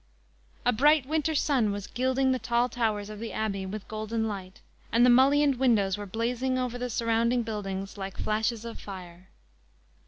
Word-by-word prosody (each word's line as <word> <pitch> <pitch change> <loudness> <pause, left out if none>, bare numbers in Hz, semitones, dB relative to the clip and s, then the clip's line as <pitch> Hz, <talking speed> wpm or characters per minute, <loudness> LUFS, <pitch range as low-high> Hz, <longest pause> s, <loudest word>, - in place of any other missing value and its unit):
A 245 - +4
bright 295 +3 +4
winter 315 +2 0
sun 260 -8 +2
was 200 -1 -4
gilding 260 +3 +1
the 255 - 0
tall 240 +1 +1
towers 215 -4 -1
of 210 - -8
the 230 0 -5
Abbey 195 -3 -2
with 205 +1 -6
golden 220 +1 -2
light, 190 -3 -6 0.3
and 235 +2 +5
the 250 - +6
mullioned 275 +2 +5
windows 220 -7 +3
were 205 0 -7
blazing 245 +5 -1
over 250 -1 -2
the 250 0 -3
surrounding 235 +1 +1
buildings 195 -2 -5
like 195 -1 -6
flashes 220 +1 -1
of 230 - -7
fire. 185 -2 -10
230 Hz, 175 wpm, -28 LUFS, 205-250 Hz, 0.3 s, the